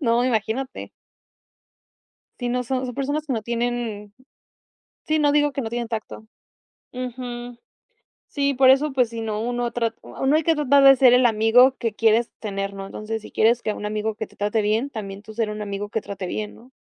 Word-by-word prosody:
no, 240 -2 +2
imagínate. 245 +2 -2 1.5
Sí, 245 -1 -2
no, 250 0 -1
son 255 +1 -2
son 250 -1 -5
personas 285 +4 -2
que 275 - -2
no 225 -3 -2
tienen 235 -3 -3 1.0
Sí, 310 0 +2
no, 290 -1 +3
digo, 295 0 +3
que 275 - -3
no 225 - -4
tienen 235 0 -3
tacto. 220 -1 -6 0.7
Ujú. 245 -1 -6 0.7
Sí, 280 -1 0
por 260 0 +5
eso, 280 +2 +3
pues, 250 -3 +2
si 230 -1 -5
no 215 -1 -3
uno 240 0 -2
trat 230 -1 -1
Uno, 270 +3 0
hay 315 - +2
que 325 +1 +2
tratar 285 -2 +4
de 270 0 +9
ser 250 -1 +6
el 250 0 +4
amigo, 235 +4 +5
que 230 -4 -2
quieres 225 +1 +2
tener, 195 -2 -3
¿no? 195 0 -7
Entonces, 215 +2 -5
si - - -11
quieres 235 +2 +2
que 215 - -1
un 210 - -5
amigo 215 +1 -2
que 220 +1 -5
te - - -23
trate 210 +2 0
bien, 220 +6 0
también 200 -4 -7
tú 220 - -11
ser 220 -1 -1
un 210 0 -6
amigo, 200 0 -4
que 220 - -1
trate 200 -2 -6
bien, 210 +3 -4
¿no? 245 +3 -18
235 Hz, 205 wpm, -23 LUFS, 215-260 Hz, 1.5 s, de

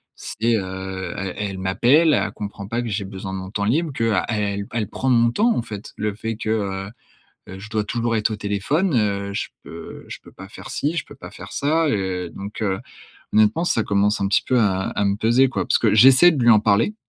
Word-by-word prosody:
C'est, 115 +1 -1
heu, 95 -2 -4
elle 95 -1 -4
elle 100 -2 -4
m'appelle, 130 - +3
elle - - +1
comprend 100 -1 -7
pas 120 +2 -2
que 120 - -4
j'ai 100 -1 -2
besoin 95 0 -7
de 95 - -3
mon 95 0 -7
temps 100 -1 -2
libre, 150 +6 0
qu'a 115 -3 0
elle 110 -2 -1 0.2
elle - - -6
elle 110 -3 -2
prend 130 - -2
mon 120 -2 +4
temps, 230 - +2
en - - 0
fait. 105 -3 -9
Le 105 -1 -2
fait 115 +1 -4
que, 110 0 -5
heu, 95 -3 -2 0.7
je 105 +3 -10
dois 110 -1 -1
toujours 115 +2 -1
être 110 0 0
au - - -2
téléphone, 115 - 0
heu, 100 -3 0
je - - -2 0.2
peux - - -10
je - - -7
peux - - -15
pas 95 - -11
faire 95 - -11
ci, 150 +4 -2
je - - -2
peux - - -13
pas - - -10
faire - - -11
ça, 160 +3 +1
heu. 95 -5 -2
Donc, 100 +3 -8
heu, 95 -2 -1 0.5
honnêtement, 110 +10 +3
ça 115 -10 +1
commence 100 +1 +1
un 100 - +1
petit 100 - +2
peu 130 - +2
à 95 -4 +2
à 100 - -1
me 100 - +1
peser, 120 +5 +3
quoi, - - -2
parce - - +2
que 110 -3 +2
j'essaie 135 +9 +7
de 140 -6 -1
lui 120 - +6
en 110 -2 +6
parler 105 - +2
105 Hz, 240 wpm, -22 LUFS, 100-120 Hz, 0.7 s, j'essaie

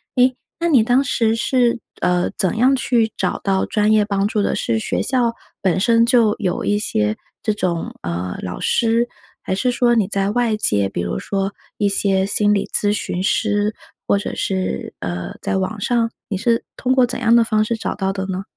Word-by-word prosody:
诶， 255 0 +4 0.2
那 340 - 0
你 265 -8 +5
当 250 +4 +3
时 225 -3 +1
是， 240 0 +1 0.2
呃， 180 0 +1
怎 190 0 +1
样 255 +3 +4
去 230 -3 +1
找 - - -1
到 190 -1 +1
专 210 0 +1
业 215 -1 +4
帮 200 -1 0
助 210 - 0
的， - - 0
是 115 -1 0
学 - - -2
校 245 -3 +1 0.3
本 190 -1 +1
身 230 +1 +4
就 230 -4 +4
有 185 -4 -1
一 205 0 +1
些 105 - 0 0.3
这 215 - +1
种， 175 -5 -2
呃， 90 +1 -4
老 90 -1 -5
师， 230 +1 +2 0.4
还 - - -2
是 250 +6 0
说 240 0 +2
你 215 -5 +2
在 195 +1 0
外 235 -2 +1
界， 100 - +2
比 90 - -3
如 85 0 -3
说 195 0 -2 0.2
一 205 - +1
些 195 -1 +2
心 205 +1 +2
理 200 - 0
咨 205 0 +3
询 185 -3 -3
师？ 210 +1 +1 0.3
或 200 - +3
者 200 - -4
是， 185 - -2
呃， 90 0 -5
在 - - -1
网 190 +3 -2
上？ 230 +1 0 0.2
你 205 - -3
是 230 +3 0
通 255 0 0
过 255 -1 +4
怎 245 0 -4
样 230 -1 +3
的 235 -1 +5
方 215 -1 +2
式 225 +1 -2
找 - - -3
到 195 -1 -1
的 190 -1 -4
呢？ 190 0 -4
210 Hz, 220 characters per minute, -20 LUFS, 190-235 Hz, 0.4 s, 你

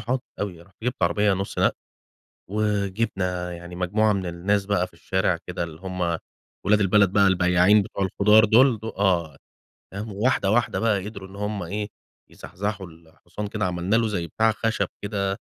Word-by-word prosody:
"حاضر 125 +4 -1 0.2
أوي." 90 -5 -4
رُحت 95 +3 -24
جِبت 125 -6 -2
عربية 100 +4 +3
نُصّ 95 +1 -3
نقل - - +3 0.8
وجِبنا 100 -3 -1
يعني 85 +1 -10
مجموعة 105 +4 +2
من 95 -2 -2
الناس 95 +4 0
بقى 95 -3 +1
في - - -27
الشارع 90 +1 0
كده 90 -1 -3
اللي 80 0 -8
هم 90 -3 -2 0.5
ولاد 105 +2 +4
البلد 100 -1 +4
بقى، 100 0 +4
البياعين 90 +2 +4
بتوع 100 0 -3
الخضار 105 +3 +5
دول، 115 +2 +5
دو 110 +2 -5
آه، 85 -8 0 0.6
تمام 105 +2 -5
وواحدة، 100 -1 +1
واحدة 120 +2 +1
بقى 105 -4 +1
قدروا 100 -3 -8
إن 95 - -13
هم 105 -1 -3
إيه 105 +4 -3 0.4
يزحزحوا 100 0 -5
الحصان 85 +5 -9
كده، 105 0 -2
عملنا 90 +4 0
له 115 -1 +3
زي 90 -5 -2
بتاع 110 +7 +2
خشب 115 +1 -1
كده، 100 -1 -2
100 Hz, 170 wpm, -24 LUFS, 90-105 Hz, 0.8 s, الخضار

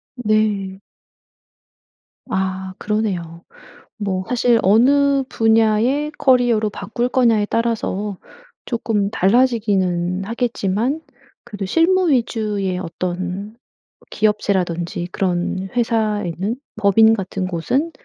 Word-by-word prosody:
네. 210 -4 0 1.5
아 190 0 -2
그러네요. 185 -6 -3 0.5
뭐 190 -3 -2
사실 245 -1 +3
'어느 275 +7 +4
분야의 225 +7 +2
커리어로 245 -5 +3
바꿀 220 +5 -3
거냐.'에 230 -5 +2
따라서 210 -4 -2 0.5
쪼끔 220 -4 -1
달라지기는 195 -5 +1
하겠지만 230 +3 -1 0.4
그래도 205 -4 -6
실무 345 - +3
위주의 210 -7 0
어떤 185 +4 -4 0.6
기업체라든지 180 -5 -1
그런 185 0 -1
회사에는, 215 -4 -1 0.2
법인 220 +1 +5
같은 190 -2 -3
곳은 255 - -1
210 Hz, 215 characters per minute, -20 LUFS, 190-235 Hz, 1.5 s, 법인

